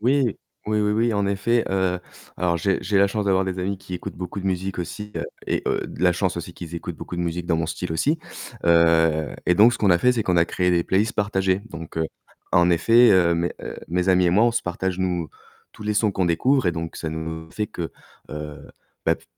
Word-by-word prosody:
Oui, 125 -1 +2 0.3
oui, 105 0 +1
oui, 105 0 +1
oui, 115 +1 +2
en 100 -1 +1
effet, 115 +4 +1
heu, 95 -2 0 0.4
alors 85 -1 +1
j'ai 95 +4 +1
j'ai 100 +2 0
la 100 - +6
chance 100 +1 -2
d'avoir 95 0 +3
des 95 0 -3
amis 95 +2 -2
qui 90 -1 -12
écoutent 90 - -6
beaucoup 90 +2 -5
de 95 - -4
musique 95 0 -2
aussi, 105 +5 -5
heu - - -2 0.2
et - - 0
heu, - - 0 0.2
la 90 -1 +4
chance 90 0 -1
aussi 85 0 -6
qu'ils 85 -1 -8
écoutent 85 - -5
beaucoup 90 - -7
de 85 - -2
musique 85 0 -3
dans 85 - +2
mon 80 - -1
style 85 +1 -4
aussi, 150 - +1 0.5
heu 80 -2 +3
et 90 - +4
donc, 110 +6 +6
ce 120 - -4
qu'on 100 -3 +3
a 85 - +5
fait, 125 +6 +4
c'est 115 - 0
qu'on 90 -3 +1
a 85 - +5
créé 90 -1 0
des 85 -1 +2
playlists 105 +6 +1
partagées, 95 -2 +1
donc 80 -1 -9
heu, 80 - +1 0.5
en 85 0 +5
effet, 115 +8 +5
heu, 85 -3 +4
mes, 85 +1 -1
heu, - - -6
mes 90 +2 0
amis 90 -1 +4
et - - +3
moi, 105 +6 +4
on 120 - +3
se 120 - 0
partage, 90 +1 -2
nous 90 -4 -1 0.4
tous 105 - -12
les 105 - 0
sons 105 0 +2
qu'on 95 -1 0
découvre 125 +10 +2
et 90 - +2
donc 80 0 -5
ça 80 - -4
nous 80 0 -5
fait 105 - -2
que, 85 -2 -5 0.4
heu, 75 -1 -7 0.4
bah, - - +4
p - - -19
90 Hz, 245 wpm, -23 LUFS, 85-105 Hz, 0.5 s, la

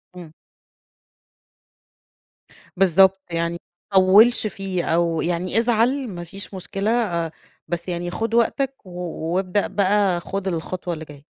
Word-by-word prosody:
إمم. 170 -3 -10 2.5
بالضبط، 190 +1 +5
يعني 170 0 -1 0.4
ما - - +5
تطوِّلش 215 +5 +5
فيه، 195 -4 -3
أو 165 -1 +1
يعني 180 +4 -1
ازعل 240 +3 +2
مافيش 190 +2 -8
مشكلة 195 +3 -3
آآ، 170 -9 0 0.4
بس 175 +1 -4
يعني 175 0 -3
خُد 225 +4 -3
وقتك 265 +1 0
و 180 - -12 0.4
وابدأ 190 +2 0
بقى 200 -2 +2
خُد 195 +1 -4
الخطوة 175 0 -3
اللي 160 0 -7
جاية. 145 -1 -14
185 Hz, 120 wpm, -22 LUFS, 175-210 Hz, 2.5 s, بالضبط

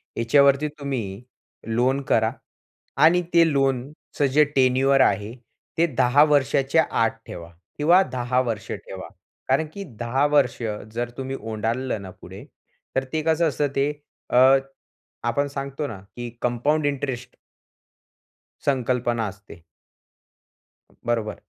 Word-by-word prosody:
ह्याच्यावरती 140 +5 +4
तुम्ही 120 -8 -4 0.5
लोन 125 +4 +1
करा, 110 0 +3 0.7
आणि 165 +5 +5
ते 165 -1 +5
लोनचं 135 +1 -1
जे 150 +2 +6
टेन्युअर 135 +1 +4
आहे 105 -2 +1 0.4
ते 165 - +4
10 125 +5 +5
वर्षाच्या 145 +1 +3 0.2
आत 115 - +2 0.2
ठेवा 85 -1 -8 0.3
किंवा 170 +5 +5
10 125 0 0
वर्ष 115 -5 -4
ठेवा, - - -7 0.4
कारण 140 +4 +2
की 200 - -6 0.2
10 125 +4 +1
वर्ष 140 -5 +3 0.4
जर 120 +1 -2
तुम्ही 135 0 -4
ओलांडलं 115 +2 -2
ना 95 - -8
पुढे - - -10 0.5
तर 130 - +1
ते 160 - 0
कसं 160 +1 +2
असतं 145 +1 0
ते? 140 +2 +1 0.4
अ, - - +1 0.9
आपण 140 +5 +1
सांगतो 140 +1 -4
ना, 110 -6 -8 0.2
की 120 0 -5
कंपाउंड 145 +6 +1
इंटरेस्ट. 130 -3 -4 1.3
संकल्पना 125 -3 0
असते. 100 -2 -13 1.5
बरोबर. 115 -2 -1
130 Hz, 120 wpm, -23 LUFS, 120-145 Hz, 1.5 s, जे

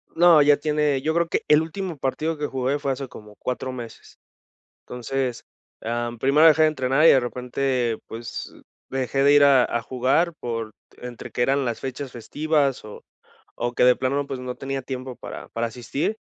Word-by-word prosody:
No, 170 -2 +7
ya 145 0 +5
tiene 150 -2 0
yo 160 +3 0
creo 170 0 +1
que - - 0
el 150 +1 +5
último 170 +1 -5
partido 155 +4 -2
que 145 - -2
jugué 135 +2 -1
fue 140 -1 -1
hace 135 0 -4
como 105 -3 -13
4 130 +1 -4
meses. 120 -3 -10 0.7
Entonces, 125 0 -3 0.4
ah, 120 +1 -2
primero 150 +6 +5
dejé 155 0 +6
de - - +6
entrenar, 135 +1 +1
y - - +9
de 135 - +6
repente, 125 -1 -1
pues, 115 +1 -7 0.4
dejé 135 +1 -1
de 145 +1 +6
ir 145 0 +7
a 135 -3 +6
a 120 - -2
jugar 130 +9 +1
por 115 -2 -4 0.3
entre 125 -1 -9
que - - -3
eran 135 +2 +2
las 120 -1 -2
fechas 135 0 -6
festivas, 145 +2 -1
o 105 - -11 0.5
o 120 +1 -2
que 125 - +2
de 125 - +6
plano, 135 +2 -1
pues, 130 -2 -5
no 125 0 -5
tenía 135 0 -4
tiempo 130 -1 -6
para - - -9
para 115 +1 -2
asistir. 125 - -3
135 Hz, 190 wpm, -23 LUFS, 125-145 Hz, 0.7 s, y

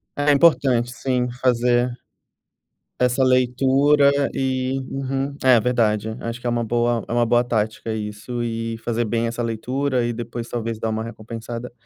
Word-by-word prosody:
É, 145 - -1
é - - +7
importante, 135 -5 +3
sim, 125 0 -1
fazer 125 0 +2 1.1
essa 125 +1 +2
leitura 135 +3 +4 0.2
e 130 0 -1
Uhum, 135 +1 -3
é 125 -3 +6
verdade, 110 -2 0
acho 115 +1 -5
que 125 - -8
é - - +2
uma 120 0 0
boa 120 0 0
é - - -4
uma 120 0 +3
boa 120 +1 +3
tática 110 -1 -2
isso 110 +3 -5
e 115 -1 -3
fazer 120 +1 -1
bem 115 +1 -1
essa 120 +1 -5
leitura 125 +3 -1
e 120 - -1
depois 115 0 -6
talvez 115 -2 -3
dar 110 - -1
uma 110 0 -2
recompensada. 115 +1 -7
120 Hz, 160 wpm, -22 LUFS, 115-130 Hz, 1.1 s, é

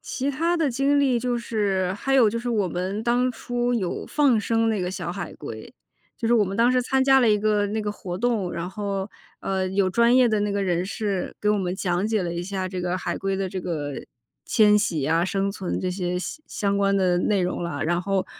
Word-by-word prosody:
其 275 +2 -2
它 335 +5 0
的 315 -4 +1
经 275 +3 +2
历 260 -4 +3
就 245 0 -1
是 200 -5 -1
还 270 +6 -1
有 250 -5 +6
就 230 +3 -2
是 240 +1 -3
我 210 -5 +1
们 185 +5 -3
当 245 +2 +2
初 245 +1 -2
有 195 -7 -2
放 275 -7 +3
生 225 +1 +1
那 215 -4 0
个 180 - -2
小 175 -2 -4
海 195 - -6
龟， - - -9 0.4
就 230 - -3
是 235 - +4
我 220 -3 +4
们 195 +1 -4
当 235 +2 +4
时 250 0 +2
参 265 +2 +1
加 270 0 +5
了 240 - +4
一 210 - +3
个 210 0 +1
那 215 +1 -2
个 210 0 -2
活 180 -3 -6
动， 225 -7 0
然 170 +1 -4
后， 200 0 -3 0.3
呃， 190 -1 -1
有 190 0 +1
专 235 +5 +3
业 255 -2 +5
的 215 -2 +1
那 205 0 0
个 200 0 -1
人 175 -1 0
士 200 -1 -3
给 210 - 0
我 210 - +3
们 180 -2 -2
讲 185 +1 0
解 220 -3 0
了 170 -1 -3
一 170 - -3
下 190 0 -3
这 185 -1 -4
个 180 +1 -1
海 - - -3
龟 195 0 -2
的 190 -1 -2
这 185 0 -4
个 150 -5 -3 0.5
迁 210 -2 +4
徙 175 -9 0
啊、 165 +2 +2
生 195 +1 -1
存 190 -2 -3
这 185 - -1
些 180 -1 -2
相 310 - -6
相 200 -1 -1
关 200 0 +2
的 180 -2 +2
内 200 +2 +1
容 180 -1 -2
了。 165 -4 -3
然 175 +2 0
后 195 0 0
200 Hz, 260 characters per minute, -24 LUFS, 185-235 Hz, 0.5 s, 有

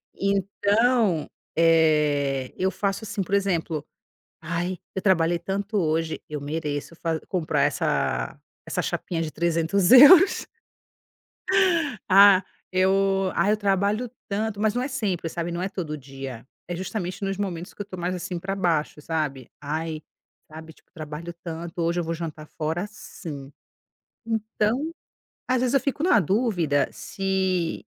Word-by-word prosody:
então, 200 0 +1 0.3
eh, 150 -5 +3
eu 190 - +1
faço 200 +1 -2
assim, 200 -1 -3
por 190 - -7
exemplo: 170 -6 -1 0.6
"Ai, 175 +2 -3 0.2
eu 190 - -3
trabalhei 175 -3 +3
tanto 200 +4 -3
hoje, 160 -1 0
eu 150 -1 -4
mereço 145 +1 -4
fa 165 -2 -2
comprar 180 -5 0
essa - - 0 0.3
essa - - -1
chapinha 165 -2 -2
de 160 - -3
€300 170 +3 +1
euros". 320 +9 +8 1.6
"Ah, 195 0 +8 0.3
eu 195 0 +2
ai 205 - +3
eu - - +2
trabalho 205 +3 0 0.2
tanto", 205 0 -2
mas 215 -1 +2
não 245 - 0
é 260 - -2
sempre, 200 - -2
sabe, 170 +1 -4
não 170 +1 -3
é 190 - -1
todo 170 -6 -4
dia, 135 -3 -8 0.2
é 175 - -3
justamente 190 +1 -4
nos 195 0 -2
momentos 180 -3 -4
que - - -5
eu - - -12
tô 190 - -8
mais 180 +1 -2
assim 180 0 -4
pra 195 +3 -3
baixo, 165 -5 0
sabe. 150 -5 -3
"Ai, 155 +2 -3 0.5
sabe? 160 +1 -10
Tipo, - - -28
trabalho 155 +1 -7
tanto, 170 +1 -6
hoje 170 +1 +1
eu - - -2
vou 165 +1 -2
jantar 160 -2 -6
fora 160 +5 -3
sim". 145 -9 -9 0.7
Então, 225 +6 -1 0.6
às 255 -1 +2
vezes, 255 +1 +1
eu 275 - +5
fico 280 +3 -2
na 360 -8 +5
dúvida 180 - +1
se 190 -3 -1
180 Hz, 145 wpm, -25 LUFS, 160-200 Hz, 1.6 s, euros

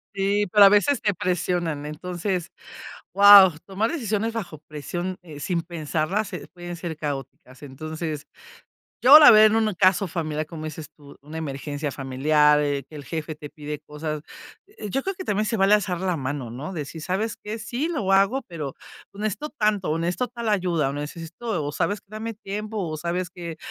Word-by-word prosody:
Sí, 200 +1 +1
pero 205 -1 +9
a 195 - +9
veces, 220 +6 +3
te 205 -3 +1
presionan, 175 -5 -1
entonces, 180 +3 -3 0.6
guau, 200 -1 +9
tomar 200 +4 -1
decisiones 225 - -1
bajo 180 -9 -6
presión, 175 +5 -5
eh, 150 -4 -10
sin 170 +1 -1
pensarlas, 170 +5 -2
eh, 180 - -7
pueden 175 -1 -7
ser 165 -2 -5
caóticas, 140 -2 -6
entonces, 155 +2 -6 0.8
yo 270 +4 +10
la 295 - +10
verdad 215 -1 +8
en 220 - +2
un 210 - -3
caso 185 +1 +3
familiar, 155 -2 -3
como 155 -1 -8
dices 155 -1 -6
tú, 145 -2 -15
una 150 +3 -10
emergencia 145 -1 -4
familiar, 150 +3 +3
eh, 145 -1 -1
que 155 - -11
el 145 - -9
jefe 155 -1 -5
te 150 -1 -9
pide 150 0 -6
cosas, 150 0 -6 0.7
yo 270 - -1
creo 390 - -3
que 375 - -7
también 210 - 0
se 225 - 0
vale 195 +2 +5
alzar 185 -4 0
la 185 -2 0
mano, 135 -3 -4
¿no?, 140 +10 -6
decir: 160 0 -6
"¿Sabes 195 +6 -2
qué?, 215 +2 -4
sí, 245 +7 -3
lo 225 - -2
hago, 200 +8 +3
pero 155 -6 -5 0.4
necesito 215 +8 -4
tanto", 210 - 0
o 160 - 0
"Necesito 175 +9 -1
tal 235 -2 -5
ayuda", 175 -8 +1
o - - -3
"Necesito" 165 +6 -5
o, 145 - -2
"¿Sabes 205 +5 -1
qué?, - - -46
dame 220 +1 -5
tiempo", 210 +1 -5
o, 160 -5 -3
"¿Sabes 175 +3 -2
qué?, 170 -3 -7
175 Hz, 185 wpm, -24 LUFS, 150-205 Hz, 0.8 s, yo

